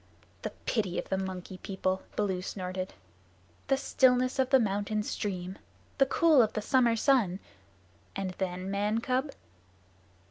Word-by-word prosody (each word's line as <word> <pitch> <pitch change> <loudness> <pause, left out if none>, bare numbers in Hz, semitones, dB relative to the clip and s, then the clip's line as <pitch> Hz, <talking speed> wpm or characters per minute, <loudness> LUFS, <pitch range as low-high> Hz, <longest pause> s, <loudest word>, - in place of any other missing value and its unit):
"The - - -3 0.2
pity 205 -6 0
of - - -4
the 190 - +1
Monkey 185 -1 -5
People!" 190 -1 -2
Baloo 190 -3 0
snorted. 185 - -5 0.7
"The 270 - +3
stillness 255 -1 +3
of 260 -1 +3
the 265 -1 +6
mountain 210 0 0
stream! 185 -3 -4 0.4
The 270 - +5
cool 310 -1 +5
of 220 - +1
the 215 - -2
summer 240 -1 +3
sun! 225 -7 +2 0.8
And 195 -1 -2
then, 185 0 -3
man 205 +3 +1
cub?" 260 +3 0
205 Hz, 140 wpm, -30 LUFS, 185-255 Hz, 0.8 s, the